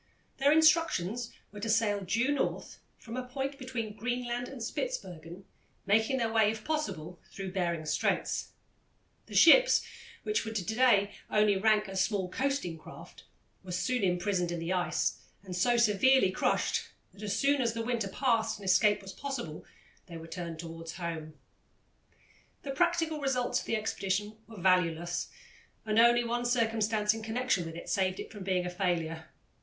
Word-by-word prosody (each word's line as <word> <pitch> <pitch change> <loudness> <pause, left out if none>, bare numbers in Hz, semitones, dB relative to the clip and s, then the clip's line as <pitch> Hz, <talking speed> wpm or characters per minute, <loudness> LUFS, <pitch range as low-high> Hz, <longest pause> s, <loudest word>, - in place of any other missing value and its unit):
Their 280 +1 +4
instructions 305 - +3 0.2
were 210 - -9
to 225 +2 -3
sail 215 -2 +2
due 230 +9 +1
North, 290 - -2 0.2
from 230 - -9
a 255 0 -4
point 275 +2 -4
between 235 -5 -4
Greenland 245 +2 -3
and 270 - -9
Spitzbergen, 185 - -5 0.4
making 220 +6 +2
their 230 -3 -1
way, 220 -2 +4
if 220 0 -4
possible, 180 - -3
through 195 -2 -6
Behring's 170 -4 -1
Straits. - - -1 0.7
The - - -9
ships, - - +7 0.4
which 425 - 0
would 220 0 -6
to 200 - 0
day 220 -2 +3 0.2
only 210 -1 +3
rank 210 +1 +3
as 190 0 0
small 195 -4 -1
coasting 260 - -2
craft, - - -13 0.4
were 185 - -8
soon 245 +6 0
imprisoned 180 -1 0
in 175 - -2
the 165 +2 -2
ice 180 -1 0 0.2
and 185 -2 -6
so 240 +7 +2
severely 235 0 +4
crushed - - +1 0.3
that 200 - -15
as 205 -2 -2
soon 280 0 +2
as 230 -2 0
the 230 0 -3
winter 235 -4 -1
passed 225 -1 0
and 200 - -11
escape 195 +2 +3
was 190 0 -8
possible, 245 - -5 0.4
they 170 -2 -8
were 165 - -9
turned 170 -1 -6
towards 165 0 -7
home. 165 -3 -5 1.3
The 275 - -4
practical 325 0 +1
results 260 -3 0
of - - -9
the - - 0
expedition 210 -1 -2
were 220 -3 -11
valueless, 175 -1 +1 0.6
and 215 0 +2
only 240 +1 +6
one 240 +1 -2
circumstance 225 -3 +1
in 225 - -6
connection 220 -5 -1
with 165 - -8
it 170 - -8
saved 190 -1 0
it - - -7
from 205 -3 -8
being 185 -1 0
a - - -2
failure. 165 -3 -2
215 Hz, 165 wpm, -30 LUFS, 180-245 Hz, 1.3 s, ships